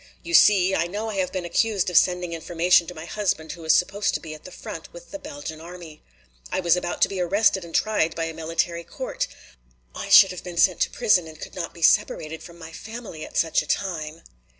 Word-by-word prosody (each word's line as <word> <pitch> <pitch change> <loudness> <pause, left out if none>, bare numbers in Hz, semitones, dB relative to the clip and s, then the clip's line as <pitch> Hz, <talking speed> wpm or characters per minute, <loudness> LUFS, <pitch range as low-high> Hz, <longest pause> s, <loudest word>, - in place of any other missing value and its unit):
"You 340 - -6
see, 195 - +6
I 170 -2 +1
know 210 +5 -4
I 200 - -5
have 185 -1 0
been 185 -2 -4
accused 200 +3 +1
of - - -6
sending 180 0 +3
information 170 +1 +2
to 180 - -8
my 155 +1 -8
husband 175 -5 -2
who 170 - -9
is 160 - +5
supposed 200 +3 +1
to - - -1
be 160 -2 -8
at 155 - -13
the 185 - -9
front - - -9
with - - -13
the 295 - -6
Belgian 285 - -8
army. 170 -2 -11 0.5
I - - 0
was 175 -2 +3
about 175 -1 -1
to - - +5
be 190 -2 -4
arrested 195 +1 +2
and 170 -1 -9
tried 210 -7 +1
by 165 - -2
a 165 - -5
military 165 +1 -2
court. - - -4 0.7
I - - -6
should 195 -2 +8
have 180 - -8
been 175 -2 -8
sent 180 0 +4
to - - +2
prison 205 -8 +2
and 160 -1 -11
I - - -19
could - - -8
not 175 -3 -5
be 170 - -9
separated 160 0 +2
from 170 -1 -12
my 165 -1 -10
family 220 -6 -8
at - - -7
such 165 -1 +2
a 155 - -10
time!" 165 -5 -3
175 Hz, 240 wpm, -24 LUFS, 165-195 Hz, 0.7 s, should